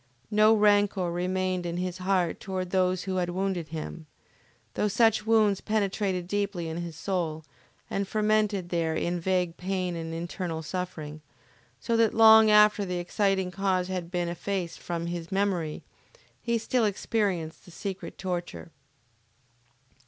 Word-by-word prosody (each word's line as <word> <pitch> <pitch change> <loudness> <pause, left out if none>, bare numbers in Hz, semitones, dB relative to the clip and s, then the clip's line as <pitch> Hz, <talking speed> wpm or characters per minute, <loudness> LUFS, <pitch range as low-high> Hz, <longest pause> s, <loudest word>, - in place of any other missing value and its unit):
No 215 +1 +5
rancor 205 -4 +3
remained 185 +1 -1
in 170 0 -3
his 180 0 -3
heart 185 -2 0
toward 185 -2 -4
those 185 -1 +1
who 190 -1 -2
had 175 -1 0
wounded 185 -2 -2
him, 160 0 -7 0.7
though 210 - +1
such 220 +1 +2
wounds 215 -3 +3
penetrated 200 -4 -1
deeply 200 -3 -2
in 160 +1 -4
his 170 -2 -5
soul, 165 -3 -2 0.4
and 200 0 -2
fermented 210 -3 +1
there 165 -2 0
in 175 +2 -1
vague 180 -1 0
pain 185 -1 -2
and 165 -1 -5
internal 165 0 -4
suffering, 155 -3 -5 0.6
so 230 - -1
that 225 -2 +3
long 220 -1 +8
after 210 0 +6
the 180 -2 -3
exciting 190 +1 0
cause 185 -1 0
had 180 -2 -3
been 175 -1 -1
effaced 175 0 -3
from 170 -1 -4
his 170 -1 -5
memory, 190 -6 -1 0.6
he 235 -1 0
still 230 +1 +1
experienced 195 -5 -1
the - - -14
secret 190 +2 -6
torture. 180 -2 -5
185 Hz, 145 wpm, -27 LUFS, 175-205 Hz, 0.7 s, long